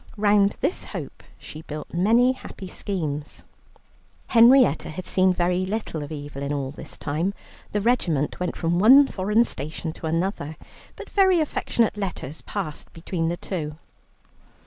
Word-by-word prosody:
Round 205 Hz, -1 st, +3 dB
this -, -, 0 dB
hope -, -, -7 dB, 0.2 s
she 155 Hz, -, -10 dB
built 150 Hz, -1 st, -8 dB
many 230 Hz, +8 st, +4 dB
happy 210 Hz, -6 st, -9 dB
schemes. 155 Hz, -7 st, -4 dB, 0.9 s
Henrietta 245 Hz, +2 st, +6 dB
had 180 Hz, +4 st, -6 dB
seen 185 Hz, 0 st, +3 dB
very 180 Hz, +1 st, +1 dB
little 190 Hz, -5 st, -3 dB
of 145 Hz, +1 st, -7 dB
Evelyn 145 Hz, -2 st, -5 dB
all 140 Hz, -2 st, -2 dB
this 150 Hz, -, -9 dB
time 165 Hz, +7 st, -2 dB, 0.4 s
the 210 Hz, -, 0 dB
regiment 175 Hz, -, +1 dB
went 180 Hz, -, -2 dB
from 170 Hz, +1 st, 0 dB
one 265 Hz, +8 st, +8 dB
foreign 210 Hz, 0 st, +1 dB
station 155 Hz, -, -5 dB
to 160 Hz, -, -6 dB
another 165 Hz, -2 st, -2 dB, 0.4 s
but -, -, -9 dB
very 380 Hz, -3 st, +4 dB
affectionate 235 Hz, -7 st, 0 dB
letters 175 Hz, -7 st, -5 dB
passed 175 Hz, -8 st, -6 dB
between 165 Hz, 0 st, -3 dB
the 170 Hz, +1 st, -1 dB
two. 155 Hz, -5 st, -5 dB
180 Hz, 145 wpm, -24 LUFS, 155-210 Hz, 0.9 s, one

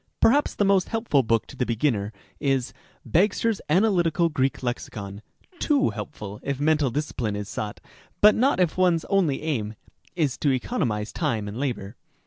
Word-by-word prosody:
Perhaps 285 Hz, +6 st, +3 dB
the 205 Hz, -, +2 dB
most 195 Hz, -2 st, +3 dB
helpful 225 Hz, -, +2 dB
book 115 Hz, -2 st, +1 dB
to -, -, -12 dB
the -, -, 0 dB
beginner 115 Hz, -3 st, 0 dB, 0.3 s
is 135 Hz, -3 st, 0 dB, 0.2 s
" -, -, -35 dB
Bagster's 205 Hz, +4 st, +2 dB
Analytical 175 Hz, -2 st, +3 dB
Greek 135 Hz, -4 st, -1 dB
Lexicon," 100 Hz, -4 st, -5 dB, 0.2 s
— 360 Hz, -, -28 dB
too 285 Hz, -3 st, +2 dB
helpful 105 Hz, -8 st, -7 dB
if 140 Hz, -1 st, -3 dB
mental 150 Hz, -2 st, +2 dB
discipline 120 Hz, -5 st, -2 dB
is 105 Hz, -1 st, -4 dB
sought, 105 Hz, 0 st, -5 dB, 0.4 s
but 210 Hz, +1 st, +7 dB
not 260 Hz, -3 st, +2 dB
if 180 Hz, 0 st, +1 dB
one's 175 Hz, -3 st, +3 dB
only 170 Hz, -8 st, +2 dB
aim 110 Hz, -9 st, -2 dB, 0.4 s
is 150 Hz, -7 st, 0 dB
to 145 Hz, -, +2 dB
economize 120 Hz, -, -1 dB
time 115 Hz, -11 st, -1 dB
and 100 Hz, -, -6 dB
labor. 120 Hz, -8 st, -3 dB
145 Hz, 165 wpm, -25 LUFS, 115-185 Hz, 0.4 s, but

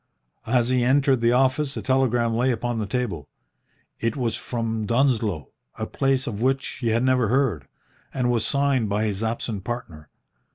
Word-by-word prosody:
As 120 Hz, 0 st, +2 dB
he 125 Hz, -1 st, +2 dB
entered 135 Hz, 0 st, +3 dB
the 115 Hz, 0 st, +3 dB
office 135 Hz, +3 st, +1 dB
a -, -, -3 dB
telegram 125 Hz, -3 st, +2 dB
lay 125 Hz, +3 st, +2 dB
upon 120 Hz, -1 st, -1 dB
the 105 Hz, -, -2 dB
table. 100 Hz, -, -3 dB, 0.7 s
It 115 Hz, +3 st, -1 dB
was 120 Hz, -4 st, -1 dB
from 115 Hz, -3 st, -3 dB
Dunsloe, 115 Hz, -, +1 dB, 0.3 s
a -, -, -3 dB
place 135 Hz, -1 st, 0 dB
of 110 Hz, -3 st, -4 dB
which 130 Hz, +2 st, +1 dB, 0.2 s
he 120 Hz, -, -1 dB
had 115 Hz, +2 st, +2 dB
never 130 Hz, -3 st, +3 dB
heard, 115 Hz, -, 0 dB, 0.4 s
and 125 Hz, -2 st, 0 dB
was 115 Hz, -3 st, +1 dB
signed 140 Hz, -3 st, +1 dB
by 105 Hz, +2 st, 0 dB
his 105 Hz, -2 st, -2 dB
absent 110 Hz, -3 st, -3 dB
partner. 85 Hz, -11 st, -6 dB
120 Hz, 170 wpm, -24 LUFS, 110-130 Hz, 0.7 s, entered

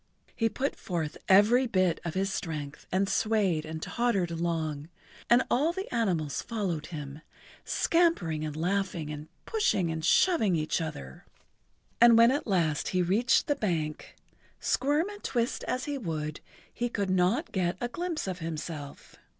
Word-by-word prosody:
He 225 Hz, -1 st, +1 dB
put 275 Hz, +5 st, -2 dB
forth 165 Hz, -5 st, -3 dB
every 220 Hz, +7 st, +6 dB
bit 185 Hz, -6 st, +1 dB
of 170 Hz, 0 st, -4 dB
his 195 Hz, +1 st, 0 dB
strength 150 Hz, -4 st, -5 dB
and 190 Hz, +2 st, +2 dB
swayed 195 Hz, -7 st, +1 dB
and 160 Hz, 0 st, -5 dB
tottered 215 Hz, -8 st, 0 dB
along, 160 Hz, -3 st, -2 dB, 0.4 s
and 240 Hz, +2 st, +6 dB
all 295 Hz, +7 st, +3 dB
the 380 Hz, -4 st, -6 dB
animals 175 Hz, -, 0 dB
followed 185 Hz, -9 st, -3 dB
him, 150 Hz, -2 st, -7 dB, 0.4 s
scampering 265 Hz, -, +1 dB
and 155 Hz, -1 st, -4 dB
laughing 175 Hz, -2 st, -1 dB
and 150 Hz, 0 st, -7 dB, 0.2 s
pushing 195 Hz, -, +1 dB
and 160 Hz, 0 st, -4 dB
shoving 220 Hz, -, +4 dB
each 155 Hz, +2 st, 0 dB
other. 70 Hz, -, -7 dB, 0.7 s
And[Pg -, -, +10 dB
85] -, -, +6 dB
when 230 Hz, +1 st, +7 dB
he -, -, +2 dB
at 290 Hz, -, -4 dB
last 165 Hz, -7 st, 0 dB
reached 190 Hz, +7 st, +3 dB
the 290 Hz, -, +1 dB
bank, 160 Hz, -, -3 dB, 0.4 s
squirm 295 Hz, +6 st, +1 dB
and 410 Hz, 0 st, -9 dB
twist 240 Hz, -1 st, -1 dB
as 255 Hz, 0 st, -2 dB
he 290 Hz, -2 st, -3 dB
would, 155 Hz, -, -4 dB, 0.3 s
he 240 Hz, 0 st, -2 dB
could 200 Hz, -5 st, -1 dB
not 185 Hz, -, +1 dB
get 180 Hz, -2 st, 0 dB
a 240 Hz, -, -1 dB
glimpse 340 Hz, +4 st, -3 dB
of 185 Hz, -2 st, -4 dB
himself. 155 Hz, -3 st, -6 dB
185 Hz, 160 wpm, -29 LUFS, 160-235 Hz, 0.7 s, And[Pg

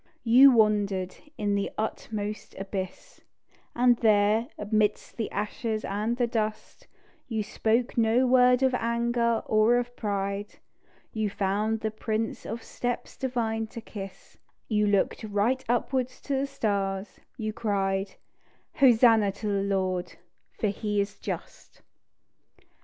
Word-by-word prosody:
You 255 Hz, +4 st, +8 dB
wandered 205 Hz, -5 st, +2 dB, 0.2 s
in 205 Hz, -1 st, 0 dB
the 200 Hz, 0 st, 0 dB
uttermost 215 Hz, -1 st, -4 dB
abyss; 190 Hz, -1 st, -6 dB, 0.5 s
And 245 Hz, 0 st, +4 dB
there, 215 Hz, +1 st, +3 dB
amidst 210 Hz, 0 st, 0 dB
the 225 Hz, -, -3 dB
ashes 215 Hz, +2 st, -3 dB
and 215 Hz, +4 st, -1 dB
the 245 Hz, -, +2 dB
dust, 220 Hz, -2 st, -4 dB, 0.4 s
You 220 Hz, -4 st, -2 dB
spoke 230 Hz, +3 st, 0 dB
no 230 Hz, +3 st, +3 dB
word 250 Hz, 0 st, +5 dB
of 260 Hz, -1 st, +3 dB
anger 235 Hz, -1 st, 0 dB
or 215 Hz, +3 st, +4 dB
of 245 Hz, 0 st, -3 dB
pride; 200 Hz, -1 st, -3 dB, 0.6 s
You 220 Hz, -2 st, -1 dB
found 210 Hz, +3 st, -1 dB
the 220 Hz, -, -1 dB
prints 220 Hz, +1 st, -3 dB
of 225 Hz, +1 st, -5 dB
steps 245 Hz, -1 st, -4 dB
divine 225 Hz, -4 st, -2 dB
to 230 Hz, -, -8 dB
kiss; 195 Hz, -4 st, -10 dB, 0.3 s
You 210 Hz, -2 st, +2 dB
looked 200 Hz, +2 st, +1 dB
right 215 Hz, +5 st, 0 dB
upwards 255 Hz, +1 st, 0 dB
to 285 Hz, -, -3 dB
the 270 Hz, +1 st, 0 dB
stars, 200 Hz, -6 st, -2 dB, 0.2 s
you 215 Hz, -3 st, -3 dB
cried: 195 Hz, -3 st, -1 dB, 0.6 s
"_Hosanna 225 Hz, -5 st, +6 dB
to 210 Hz, -, -5 dB
the 200 Hz, -1 st, +1 dB
Lord, 185 Hz, -2 st, -1 dB, 0.4 s
for 215 Hz, -, +1 dB
He 205 Hz, +1 st, -2 dB
is 200 Hz, +1 st, -2 dB
just. -, -, -7 dB
220 Hz, 130 wpm, -27 LUFS, 205-235 Hz, 0.6 s, You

